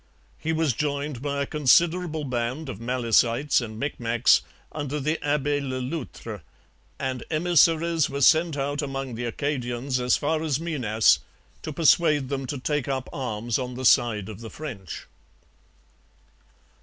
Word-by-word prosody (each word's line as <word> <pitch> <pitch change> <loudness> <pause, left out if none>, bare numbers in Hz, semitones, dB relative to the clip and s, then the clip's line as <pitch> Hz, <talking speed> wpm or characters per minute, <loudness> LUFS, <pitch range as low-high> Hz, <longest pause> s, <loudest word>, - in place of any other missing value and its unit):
He 160 - -2
was 160 -4 +1
joined 145 -1 -2
by 140 0 -1
a - - -3
considerable 160 +3 +2
band 130 +3 -3
of 95 - -6
Malecites 120 +2 +2
and 110 -2 -7
Micmacs 120 -4 +2 0.3
under 145 -1 -3
the 155 +3 -1
Abbe 145 0 +1
Le 130 -2 -3
Loutre; 125 - -6 0.6
and 130 -2 -3
emissaries 165 -1 +3
were 140 +1 -4
sent 160 +2 +4
out 145 +1 -1
among 135 -3 -4
the 120 +2 -4
Acadians 130 0 -2
as 125 0 +2
far 155 +2 0
as 155 -3 0
Minas 125 -10 +2 0.4
to 155 - -5
persuade 150 -3 +3
them 135 -2 -3
to 145 - -3
take 145 +1 -1
up 135 -2 -2
arms 120 -3 -2
on 125 -1 -4
the 130 +1 -4
side 110 -5 +4
of 110 -2 -8
the 115 - -7
French. 110 - -7
140 Hz, 145 wpm, -25 LUFS, 120-150 Hz, 0.6 s, sent